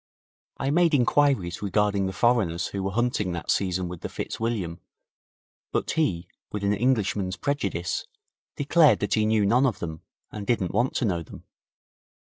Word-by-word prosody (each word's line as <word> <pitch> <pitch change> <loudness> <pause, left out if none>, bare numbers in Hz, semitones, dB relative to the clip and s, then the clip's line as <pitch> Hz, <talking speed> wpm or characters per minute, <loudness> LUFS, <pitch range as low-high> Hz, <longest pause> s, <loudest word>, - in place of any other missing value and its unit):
I 135 - -1
made 170 0 +4
inquiries 125 -9 +2
regarding 100 -1 +1
the - - -2
foreigners 95 -5 +1
who 100 - -4
were 95 - -1
hunting 115 -5 0
that 85 -1 -2
season 95 -2 0
with 85 -1 -8
the - - -4
Fitzwilliam, 100 -7 -3 0.9
but - - -1
he, 95 - 0 0.2
with 105 -1 -4
an 100 +1 +2
Englishman's 105 -5 0
prejudice, 140 - -2 0.5
declared 145 -4 +4
that 100 - 0
he 110 -1 +2
knew 110 -2 +3
none 125 +6 +4
of 115 -8 -1
them, 80 -2 -6 0.3
and 105 -2 -7
didn't 110 -7 0
want 125 +2 +1
to - - +1
know 90 -5 0
them. 80 - -11
105 Hz, 160 wpm, -26 LUFS, 95-125 Hz, 0.9 s, made